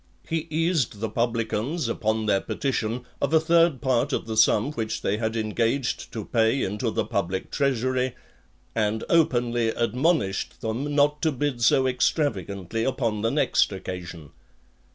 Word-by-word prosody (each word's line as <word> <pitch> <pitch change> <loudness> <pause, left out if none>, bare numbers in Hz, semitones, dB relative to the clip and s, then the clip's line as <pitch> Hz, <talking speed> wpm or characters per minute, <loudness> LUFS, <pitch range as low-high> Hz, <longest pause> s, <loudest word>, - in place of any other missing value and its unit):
He 165 0 -2
eased 160 - 0
the 110 0 -3
publicans, 115 +5 -1
upon 110 -1 -1
their 100 -2 +2
petition, 125 -3 -2 0.2
of 160 - +2
a - - +7
third 165 -4 +3
part 130 +2 +1
of - - -1
the 110 -1 -4
sum 110 +4 +4
which 110 -6 -3
they 105 - +1
had 110 0 -2
engaged 115 +4 -1
to 110 -3 -5
pay 115 +3 +2
into 105 +5 -1
the - - -1
public 95 -1 -2
treasury; 130 -2 0 0.6
and 110 0 0
openly 120 -8 +2
admonished 120 - 0
them 130 +6 -2
not 150 +1 +3
to 160 - +2
bid 135 -2 -2
so 130 +3 +4
extravagantly 115 - -1
upon 115 -4 -1
the 115 - +1
next 145 -4 +2
occasion. 90 -5 -7
115 Hz, 150 wpm, -25 LUFS, 110-140 Hz, 0.6 s, a